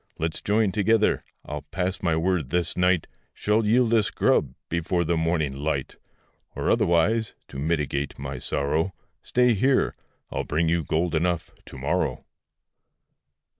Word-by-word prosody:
Let's 80 0 -2
join 105 -1 +2
together; 110 +2 +2 0.2
I'll 75 0 -5
pass 90 +5 -3
my 85 -3 +1
word 80 -4 0
this 85 +1 0
night 90 -2 +2 0.3
Shall 105 +2 +1
yield 115 +2 +3
us 110 -4 +3
grub, - - +1
before 85 +1 0
the 85 +1 0
morning 80 -4 0
light. 70 -1 -2 0.6
Or - - 0
otherwise 105 +7 +2
(to 65 - -7
mitigate 75 -2 -1
my 70 -1 -5
sorrow), 75 +9 -1 0.3
Stay 125 -1 +3
here, 130 +6 +2 0.4
I'll - - -2
bring 80 +3 0
you 85 0 +1
gold 85 +4 0
enough 85 +1 0
to - - -10
morrow. 75 +8 -1
85 Hz, 140 wpm, -25 LUFS, 75-100 Hz, 0.6 s, yield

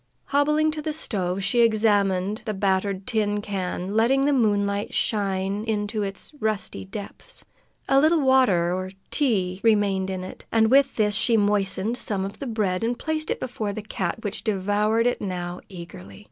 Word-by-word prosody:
Hobbling 300 +2 +2
to 305 0 -5
the 310 0 -3
stove, 195 - -2
she 205 +5 +1
examined 210 -2 +2
the 215 -2 -2
battered 190 0 0
tin 210 -4 0
can, 190 -2 -4
letting 255 +5 +3
the 290 - +3
moonlight 205 -4 +1
shine 200 -1 0
into 215 -1 -1
its 195 +7 -5
rusty 210 - -2
depths. 205 - -9 0.4
A 270 - +5
little 315 +2 +4
water 250 -11 +3
or 185 0 -3 0.2
tea 195 -10 +1
remained 200 -4 +2
in 185 -1 -4
it, 185 - -9
and 220 0 +3
with 275 0 +4
this 210 -2 +2
she 225 +3 +3
moistened 205 +2 +1
some 195 -3 0
of 195 - -8
the 275 - -5
bread 210 -4 -1
and 235 +1 0
placed 315 -1 -2
it - - -1
before 215 -5 -3
the 215 - -6
cat, 200 0 -3
which 205 -1 -4
devoured 210 +2 +1
it 245 - 0
now 180 -2 -4
eagerly. 155 - -10
205 Hz, 170 wpm, -24 LUFS, 190-230 Hz, 0.4 s, A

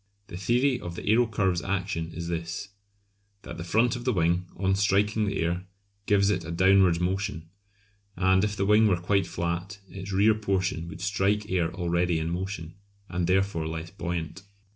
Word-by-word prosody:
The - - -8
theory 125 +7 +1
of 85 -5 -7
the - - -7
aerocurve's 105 -5 +2
action 95 -4 -2
is 85 0 -6
this: 85 +3 -4 0.7
that 85 0 -8
the - - -4
front 115 +8 +2
of 120 - -6
the 125 - +1
wing, 90 -2 +1
on 95 +1 +1
striking 105 +2 +2
the 100 - -1
air, 90 +3 -2 0.4
gives 100 -1 +4
it 95 -4 -1
a 80 - -8
downwards 95 0 +4
motion, 95 -2 -2 0.7
and 95 +1 +3
if 105 0 0
the 100 - +1
wing 105 +2 +5
were 95 -4 +2
quite 90 +1 +1
flat 85 +4 -3
its 95 +1 -8
rear 100 +3 +4
portion 95 -5 -1
would 85 - -9
strike 100 +1 0
air 85 -3 +1
already 85 -1 0
in 80 +1 -2
motion, 85 -2 -4 0.4
and 90 -1 -1
therefore 95 -3 +1
less 80 +1 -5
buoyant. 85 +1 -4
95 Hz, 175 wpm, -27 LUFS, 85-100 Hz, 0.7 s, wing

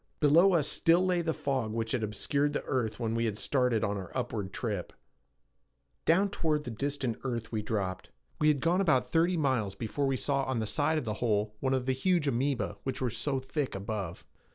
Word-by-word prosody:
Below 165 +6 +6
us 155 -5 +3
still 170 +3 +3
lay 180 -2 +2
the 165 -1 0
fog 130 -8 -2
which 115 0 -2
had 125 - 0
obscured 140 +7 0
the - - -2
earth 120 -5 -1
when 115 -2 -1
we 115 0 +1
had 110 -2 -2
started 125 -4 +1
on 100 0 0
our 95 -3 -7
upward 115 -6 -3
trip. 105 -7 -3 1.1
Down 190 +5 +3
toward 155 -6 0
the 125 - -5
distant 135 0 -2
earth 120 -4 -3
we 110 -2 -1
dropped. 100 -3 -3 0.3
We 150 - +3
had 145 -3 +3
gone 175 +3 +2
about 155 -9 +3
thirty 170 +2 +3
miles 130 -10 0
before 135 +5 -2
we 135 -1 +1
saw 140 +2 0
on 130 -1 -1
the 110 - -1
side 150 +8 +1
of 150 - -2
the 110 - -1
hole 105 -3 +1
one 135 0 +1
of 130 -1 -1
the 130 - +1
huge 170 +4 +1
amoeba 135 +1 0
which 135 - -3
were 125 -3 0
so 135 +5 -1
thick 130 0 -3
above. 100 -3 -4
130 Hz, 210 wpm, -30 LUFS, 110-150 Hz, 1.1 s, Below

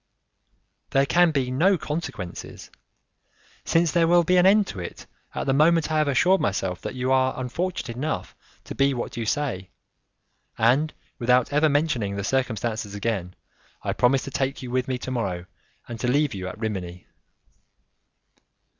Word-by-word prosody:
"There 135 0 +3
can 175 +4 +4
be 135 -5 -1
no 180 +9 +3
consequences, 150 - -6 0.9
since 165 -1 +2
there 165 0 +3
will 175 0 +5
be 180 +2 +3
an 180 +1 +6
end 205 +1 +5
to 95 - -6
it 85 - -7 0.3
at - - -2
the 135 - +2
moment 160 +2 +3
I 155 - +2
have 155 - +2
assured 180 +7 +3
myself 95 -2 -1
that - - -5
you 130 +1 -1
are 130 0 +2
unfortunate 130 0 -3
enough 155 +4 -3 0.3
to - - -7
be 135 0 +2
what 120 - -4
you 115 -2 -3
say, 120 -10 -2 0.9
and 135 +7 +3 0.3
without 125 +2 +2
ever 150 +2 +4
mentioning 140 -9 0
the 100 - -3
circumstances 110 -3 -2
again, 100 -4 -3 0.5
I - - -1
promise 130 +2 +2
to 140 - -7
take 135 +1 -2
you 125 - -6
with 130 0 0
me 130 -1 -1
to 130 - -6
morrow 95 -8 -2 0.4
and 120 -1 -7
to 125 - -1
leave 145 +1 +2
you 95 -2 -5
at 95 - -7
Rimini." 95 -5 -5
130 Hz, 165 wpm, -24 LUFS, 110-155 Hz, 0.9 s, an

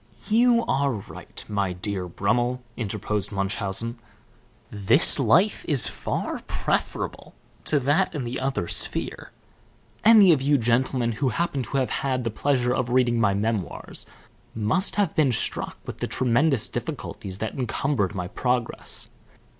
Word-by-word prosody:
"You 235 +1 +4
are 140 +1 +1
right, 105 -4 -9
my 100 -3 -1
dear 90 0 -4
Brummel," 120 +7 -1
interposed 105 -2 -3
Munchausen. 100 +4 -3 0.7
"This 105 - +4
life 175 - +3
is 140 -5 +2
far - - -3
preferable - - -3 0.3
to 150 - +2
that 155 +7 +1
in 145 - -2
the 120 +2 -4
other 130 -9 -2
sphere. - - +2 0.7
Any 210 -4 +8
of 140 - 0
you 145 +1 +3
gentlemen 120 0 +1
who 130 +4 -1
happen 145 +1 -1
to 135 - -3
have 130 -2 0
had 130 -2 -1
the 115 - -2
pleasure 125 +1 +1
of 125 -1 -1
reading 120 -1 +2
my 100 -3 +2
memoirs 105 -3 -3 0.5
must 110 - +1
have 200 -5 +1
been 145 -4 +3
struck 115 - -1
with - - -7
the - - -2
tremendous 130 +1 +2
difficulties 95 -1 -5
that 110 +2 -4
encumbered 125 -4 -1
my 90 -2 -3
progress. 125 +4 -2
125 Hz, 140 wpm, -24 LUFS, 105-140 Hz, 0.7 s, Any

